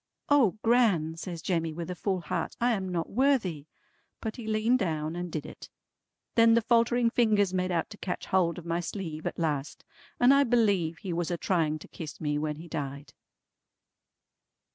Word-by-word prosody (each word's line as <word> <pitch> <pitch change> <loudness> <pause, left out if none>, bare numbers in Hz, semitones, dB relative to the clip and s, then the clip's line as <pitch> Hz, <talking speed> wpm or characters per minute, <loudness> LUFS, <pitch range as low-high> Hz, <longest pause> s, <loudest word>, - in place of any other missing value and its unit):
'" - - -35
"O 260 -9 +4
Gran," 210 -10 +3
says 170 -1 -6
Jemmy 165 -3 -1
with 170 +2 -5
a - - -4
full 190 -1 -1
heart, 150 - -3
"I 245 +1 +3
am 190 -4 -1
not 170 -2 -3
worthy!" 210 - +1 0.5
But 220 +2 -5
he 230 -3 -7
leaned 220 +4 +2
down 160 -4 -2
and 175 -1 -4
did 155 -2 -4
it. - - -10 0.6
Then 230 0 +6
the 230 - +3
faltering 235 +1 +3
fingers 210 -6 +2
made 185 0 0
out 170 +2 -1
to 205 - -10
catch 180 - -4
hold 175 -3 +1
of 175 - -8
my 170 0 -1
sleeve 165 -3 -5
at - - -4
last, 150 -3 -2 0.3
and 245 +2 +6
I 280 0 +5
believe 200 - +2
he 180 +2 -5
was 170 0 -1
a 175 - -1
trying 160 -4 0
to 155 - -13
kiss 160 -3 -8
me 150 -1 -1
when 150 0 -2
he 165 +3 -10
died. 140 -3 -5
180 Hz, 190 wpm, -28 LUFS, 160-225 Hz, 0.6 s, Then